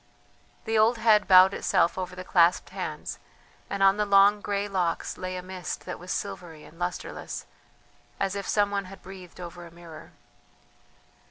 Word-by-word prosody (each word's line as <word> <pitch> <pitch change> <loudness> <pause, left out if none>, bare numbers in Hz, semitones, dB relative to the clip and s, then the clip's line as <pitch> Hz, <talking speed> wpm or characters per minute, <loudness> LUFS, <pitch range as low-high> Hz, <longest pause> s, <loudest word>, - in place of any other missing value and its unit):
The 220 0 +1
old 230 +2 +4
head 220 -2 +4
bowed 185 0 +7
itself 170 - +1
over 185 -1 -5
the 185 - -7
clasped 175 -1 +3
hands, - - -5 0.5
and 200 0 -1
on 195 +1 +5
the 210 - +1
long 200 +1 +5
grey 200 0 -2
locks 180 -4 -2
lay 185 0 -5
a 180 - -6
mist 185 -1 -6
that - - -6
was 180 +1 -8
silvery 165 -4 -5
and 165 - -16
lustreless, 180 0 -5 0.7
as 195 -1 0
if 200 0 -5
some 205 -1 +2
one 200 -1 -2
had 195 +1 -13
breathed 185 -2 -12
over 175 0 -8
a 170 - -11
mirror. 165 -2 -13
185 Hz, 170 wpm, -27 LUFS, 175-200 Hz, 0.7 s, bowed